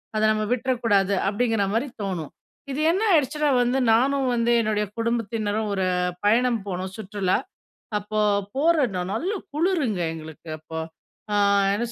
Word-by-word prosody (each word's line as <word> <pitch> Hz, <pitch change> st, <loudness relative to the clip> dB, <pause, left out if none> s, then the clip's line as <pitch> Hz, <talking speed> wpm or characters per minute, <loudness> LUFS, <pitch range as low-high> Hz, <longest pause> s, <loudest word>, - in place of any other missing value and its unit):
அத 215 Hz, -, +1 dB
நம்ம 215 Hz, 0 st, 0 dB
விட்றக்கூடாது 230 Hz, -6 st, +1 dB
அப்பிடிங்கிறமாரி 225 Hz, +2 st, 0 dB
தோணும். 180 Hz, -7 st, -3 dB, 0.4 s
இது 275 Hz, -, -3 dB
என்ன 380 Hz, +5 st, 0 dB
ஆயிடுச்சுனா 300 Hz, -1 st, +2 dB
வந்து 245 Hz, +2 st, +1 dB, 0.2 s
நானும் 270 Hz, +3 st, +2 dB
வந்து 235 Hz, 0 st, +1 dB
என்னுடைய 210 Hz, -1 st, 0 dB
குடும்பத்தினரும் 220 Hz, -2 st, -1 dB
ஒரு 190 Hz, -1 st, 0 dB, 0.4 s
பயணம் 235 Hz, +2 st, +3 dB
போனோம். 185 Hz, 0 st, -4 dB
சுற்றுலா! 200 Hz, -3 st, 0 dB, 0.6 s
அப்போ 215 Hz, +1 st, -4 dB, 0.4 s
போற 325 Hz, +5 st, +3 dB, 0.2 s
நானு 180 Hz, +1 st, -3 dB
நல்ல 355 Hz, -, -1 dB, 0.2 s
குளிருங்க 300 Hz, -, 0 dB
எங்களுக்கு 160 Hz, 0 st, -10 dB
அப்போ. 160 Hz, +1 st, -7 dB, 0.5 s
ஆ -, -, +1 dB, 0.4 s
என்ன 210 Hz, +4 st, 0 dB
220 Hz, 130 wpm, -24 LUFS, 200-255 Hz, 0.6 s, பயணம்